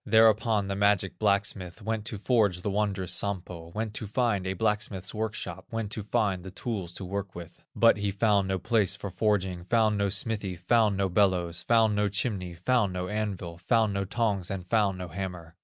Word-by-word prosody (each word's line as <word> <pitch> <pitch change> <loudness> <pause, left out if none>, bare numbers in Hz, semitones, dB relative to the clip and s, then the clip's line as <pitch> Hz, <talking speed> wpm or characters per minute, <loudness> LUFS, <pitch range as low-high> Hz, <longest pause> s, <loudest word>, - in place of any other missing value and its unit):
Thereupon 110 -1 +4
the 100 - -2
magic 100 -1 +2
blacksmith 100 -3 0
Went 110 0 -2
to 110 -2 -4
forge 100 -5 +2
the 100 - -1
wondrous 100 -3 0
Sampo, 90 -4 -3
Went 110 -1 -2
to 110 - -5
find 105 -4 0
a 95 - 0
blacksmith's 105 -2 -1
workshop, 105 -4 -4
Went 115 -3 -3
to 110 - -2
find 100 -2 0
the 95 - -7
tools 95 -2 -4
to 95 - -6
work 100 +1 -4
with; 85 -1 -10
But 115 -1 +5
he 100 -1 -1
found 100 -1 +2
no 95 0 0
place 100 -1 +1
for 100 -1 -6
forging, 95 -5 0
Found 110 0 +2
no 100 0 +1
smithy, 105 -2 -1
found 105 +3 +2
no 100 0 +1
bellows, 90 -3 +1
Found 115 -2 +4
no 105 0 +1
chimney, 100 -4 -2
found 105 +2 +1
no 90 0 -3
anvil, 100 -5 -3
Found 110 +1 +2
no 100 0 0
tongs, 100 -2 -1
and 95 -2 -4
found 100 -1 +2
no 90 0 -5
hammer. 90 -2 -6
100 Hz, 190 wpm, -28 LUFS, 95-110 Hz, -, But